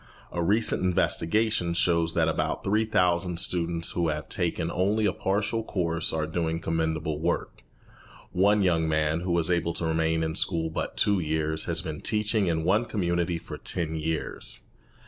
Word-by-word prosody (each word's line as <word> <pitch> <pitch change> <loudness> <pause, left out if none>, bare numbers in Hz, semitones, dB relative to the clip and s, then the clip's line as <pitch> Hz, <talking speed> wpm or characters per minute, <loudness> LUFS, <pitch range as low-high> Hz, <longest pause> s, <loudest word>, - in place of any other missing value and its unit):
A 85 - -2
recent 105 +6 +2
investigation 90 +1 +1
shows 85 -1 +2
that 80 -1 +3
about 80 - -1
3,000 90 -5 +1
students 85 -1 0
who 85 -1 0
have 75 -1 -3
taken 85 -2 -1
only 105 +4 +1
a 105 - +2
partial 105 +4 -1
course 85 -5 -1
are 80 -1 -1
doing 80 0 -2
commendable 80 -2 -1
work. 80 - -2 0.7
One 100 +2 +3
young 80 -3 +2
man, 80 +1 +1
who 90 +1 -3
was 85 0 +1
able 85 -1 +1
to 85 - -2
remain 80 0 +1
in 80 0 -1
school 80 -1 0
but - - -4
two 100 -2 +3
years, 80 -1 -1
has 85 -1 -2
been 80 -4 -5
teaching 105 -2 +1
in 80 -2 0
one 105 +7 +2
community 85 -5 -1
for - - -9
ten 80 -3 -1
years. 80 0 -3
85 Hz, 165 wpm, -27 LUFS, 80-95 Hz, 0.7 s, that